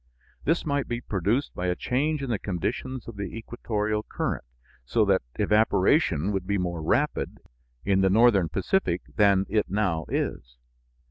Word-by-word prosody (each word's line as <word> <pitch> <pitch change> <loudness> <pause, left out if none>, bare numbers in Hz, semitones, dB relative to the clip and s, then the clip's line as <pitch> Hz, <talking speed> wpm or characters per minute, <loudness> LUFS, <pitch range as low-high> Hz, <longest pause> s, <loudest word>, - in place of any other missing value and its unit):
This 165 +4 +1
might 140 -2 0
be 120 0 -2
produced 110 +5 -1
by 90 - -3
a 90 - +1
change 145 +7 -1
in 130 - -2
the 110 - 0
conditions 115 +7 -3
of 115 -3 -8
the 100 +2 -5
equatorial 110 -2 -2
current, - - -3 0.4
so 110 - +2
that 95 -1 +3
evaporation 105 - +3
would 95 -2 -2
be 100 0 +1
more 90 -3 -2
rapid 80 - 0 0.5
in 95 -1 +3
the 95 - +4
northern 100 -4 +4
Pacific 90 - 0
than 100 -2 +4
it 105 0 0
now 95 -6 0
is. - - -3
105 Hz, 155 wpm, -26 LUFS, 95-120 Hz, 0.5 s, the